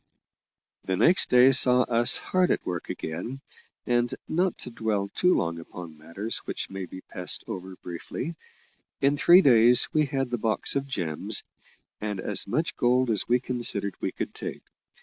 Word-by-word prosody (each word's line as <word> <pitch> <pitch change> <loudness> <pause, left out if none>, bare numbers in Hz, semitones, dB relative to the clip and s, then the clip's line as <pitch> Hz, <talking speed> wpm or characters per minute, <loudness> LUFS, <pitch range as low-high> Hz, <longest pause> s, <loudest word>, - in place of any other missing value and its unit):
The 95 -1 -1
next 175 - +4
day 125 +2 +6
saw 125 -1 +6
us 120 -1 +4
hard 185 -1 0
at - - -1
work 90 -2 -5
again, 115 +12 -5 0.5
and, 120 0 +1 0.2
not 180 +2 0
to 125 - -7
dwell 110 -4 -2
too 180 - +2
long 85 0 -2
upon 85 -1 -10
matters 85 +8 -5
which - - -6
may 95 -1 -5
be 95 +1 -11
passed 90 -1 -3
over 95 0 -7
briefly, 90 - -7 0.7
in 140 +1 +2
three 175 +5 +6
days 120 -1 +5
we 155 -1 +2
had 135 -3 -3
the 120 - -2
box 110 +4 0
of 140 0 -1
gems, 85 - -3 0.6
and 105 -2 -4
as 100 0 0
much 155 +11 -1
gold 125 -1 +2
as 105 - -1
we 125 +1 +3
considered 120 -6 -1
we - - -2
could - - -6
take. - - -7
120 Hz, 170 wpm, -26 LUFS, 95-135 Hz, 0.7 s, day